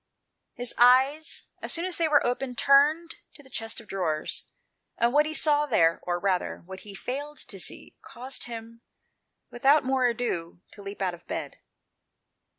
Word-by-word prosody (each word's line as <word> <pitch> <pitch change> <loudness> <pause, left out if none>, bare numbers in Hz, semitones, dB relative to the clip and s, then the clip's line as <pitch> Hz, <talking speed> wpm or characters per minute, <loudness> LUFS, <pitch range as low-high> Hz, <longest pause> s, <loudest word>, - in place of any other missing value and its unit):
His 245 0 -1
eyes, 265 +5 +4 0.2
as - - -2
soon 340 +1 -1
as 370 -2 0
they 330 - +2
were 295 -2 +4
open, 250 +1 -2
turned 300 +6 +4 0.2
to 290 - -13
the 265 - -18
chest 225 0 -4
of 230 - -14
drawers; 165 -6 -1 0.5
and 235 +1 +2
what 300 +1 +4
he 310 - -4
saw 295 -1 +3
there, 165 - +3
or 175 0 -2
rather, 185 -1 -1
what 190 +1 -9
he 205 -2 -11
failed 290 +7 -5
to 200 -6 -7
see, - - -6
caused 255 +2 -5
him, 230 -1 -9 0.7
without 275 +5 +4
more 260 -1 +2
ado, 205 -9 -3
to 205 - -13
leap 200 0 -6
out 185 -2 0
of 175 - -13
bed. - - -5
245 Hz, 170 wpm, -27 LUFS, 200-290 Hz, 0.7 s, eyes